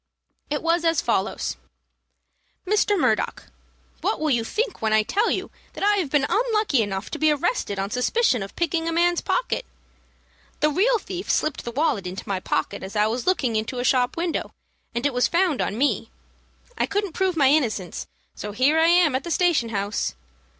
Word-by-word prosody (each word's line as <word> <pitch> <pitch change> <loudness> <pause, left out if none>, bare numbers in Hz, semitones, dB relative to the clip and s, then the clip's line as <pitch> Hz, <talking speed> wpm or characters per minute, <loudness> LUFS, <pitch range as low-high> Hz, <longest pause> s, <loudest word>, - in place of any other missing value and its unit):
It 295 +1 -2
was 335 +1 +2
as 330 -1 +2
follows: - - -1 1.1
"MR. 410 0 +2
MURDOCK, 245 -7 0 0.6
What - - 0
will 310 -1 0
you 235 -3 +2
think 430 - -2
when 220 -1 +1
I 215 0 +4
tell 415 - +1
you - - -2 0.2
that - - -6
I 410 0 +4
have 350 -8 -1
been 285 0 +2
unlucky 425 - +2
enough 195 -2 -3
to - - -4
be 310 - +4
arrested 300 - 0
on 195 +1 -2
suspicion 250 - +1
of 195 - -7
picking 335 -1 0
a - - 0
man's 345 +1 +2
pocket? - - -1 1.0
The 300 0 +3
real 455 +10 +3
thief 375 -3 -7
slipped 305 -2 0
the 235 - -3
wallet 245 - 0
into 185 +2 -7
my 195 -2 -1
pocket 200 +2 -2
as 190 +3 -8
I 210 0 +3
was 230 +6 -2
looking 265 -11 +1
into 220 +4 -2
a 245 - -1
shop 250 +1 +2
window, 340 -1 -2 0.4
and 235 +3 -1
it 285 - +1
was 250 0 +3
found 340 -5 +1
on 205 - -2
me. 280 +3 0 0.7
I - - +2
couldn't 405 -3 -2
prove 375 -1 0
my 275 -3 +5
innocence, 230 - 0 0.3
so 210 0 -6
here 275 +8 +3
I 325 - +5
am 340 -4 +5
at 260 +1 -1
the - - -6
station 335 -8 +2
house. 200 - -2
295 Hz, 190 wpm, -24 LUFS, 230-355 Hz, 1.1 s, my